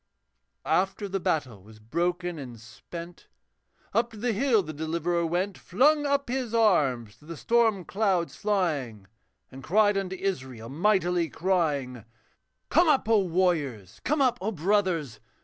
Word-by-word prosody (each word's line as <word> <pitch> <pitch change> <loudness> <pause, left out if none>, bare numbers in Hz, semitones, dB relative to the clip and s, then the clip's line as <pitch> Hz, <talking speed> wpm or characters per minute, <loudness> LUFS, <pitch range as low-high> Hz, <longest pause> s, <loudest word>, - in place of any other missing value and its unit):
After 195 +2 0
the 195 0 -2
battle 130 - -2
was 110 +3 -16
broken 175 +9 -2
and 125 -4 -9
spent 170 +10 -11 0.7
Up 235 +1 +2
to 225 - -13
the 235 +2 -1
hill 225 -2 +2
the 155 -1 -7
Deliverer 170 +2 -1
went, 180 +4 -2
Flung 290 - +2
up 280 0 0
his 245 -2 -2
arms 140 - +2
to 150 - -21
the 165 0 -8
storm 225 -4 +2
clouds 190 -5 0
flying, 150 - -1 0.5
And 135 - -10
cried 205 +2 +3
unto 190 -1 -4
Israel, 130 - -4
mightily 175 0 +1
crying, 145 - -1 0.7
'Come 345 -2 +4
up, 275 -7 +2
O 225 -2 +4
warriors! 165 - -1
come 295 0 +2
up, 245 -2 +1
O 210 +3 -1
brothers! 175 - 0
180 Hz, 145 wpm, -27 LUFS, 145-210 Hz, 0.7 s, Come